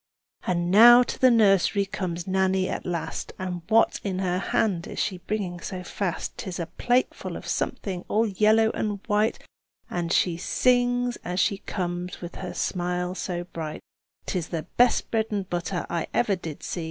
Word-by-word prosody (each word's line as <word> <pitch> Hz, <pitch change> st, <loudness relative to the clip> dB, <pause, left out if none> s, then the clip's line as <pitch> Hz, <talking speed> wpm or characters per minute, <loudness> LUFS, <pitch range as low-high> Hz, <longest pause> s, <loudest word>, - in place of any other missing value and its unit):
And 175 Hz, -1 st, 0 dB
now 240 Hz, +4 st, +9 dB
to -, -, -6 dB
the 260 Hz, -, +6 dB
nursery 200 Hz, -3 st, +4 dB
comes 175 Hz, -3 st, -4 dB
Nannie 190 Hz, 0 st, +1 dB
at -, -, -4 dB
last, 170 Hz, -2 st, -4 dB
And 180 Hz, -2 st, -4 dB
what 225 Hz, +1 st, +4 dB
in 190 Hz, -3 st, -2 dB
her 185 Hz, -1 st, 0 dB
hand 190 Hz, -3 st, 0 dB
is -, -, -8 dB
she 185 Hz, -3 st, -1 dB
bringing 185 Hz, -3 st, -3 dB
so 180 Hz, +1 st, -6 dB
fast? 180 Hz, -1 st, -4 dB
'Tis 185 Hz, -3 st, -5 dB
a 170 Hz, -, -2 dB
plate 245 Hz, +9 st, +1 dB
full -, -, -7 dB
of -, -, -10 dB
something 185 Hz, -3 st, -2 dB
all 220 Hz, +2 st, +2 dB
yellow 220 Hz, +2 st, +3 dB
and 205 Hz, -2 st, -2 dB
white, 210 Hz, 0 st, +1 dB, 0.5 s
And 170 Hz, -1 st, -2 dB
she 175 Hz, -3 st, +2 dB
sings 245 Hz, +4 st, +2 dB
as 180 Hz, +1 st, -2 dB
she 200 Hz, -1 st, +2 dB
comes 180 Hz, -2 st, -4 dB
with 175 Hz, 0 st, -8 dB
her 185 Hz, -1 st, -6 dB
smile 180 Hz, 0 st, -1 dB
so 180 Hz, -1 st, -3 dB
bright: 165 Hz, -3 st, -6 dB, 0.4 s
"'Tis 175 Hz, -4 st, -2 dB
the 165 Hz, -3 st, -3 dB
best 245 Hz, 0 st, +3 dB
bread 220 Hz, -1 st, +1 dB
and 200 Hz, -3 st, -2 dB
butter 175 Hz, 0 st, -2 dB
I 170 Hz, -2 st, -2 dB
ever 210 Hz, -5 st, +2 dB
did 165 Hz, -4 st, -8 dB
see! -, -, -4 dB
185 Hz, 180 wpm, -26 LUFS, 175-215 Hz, 0.5 s, now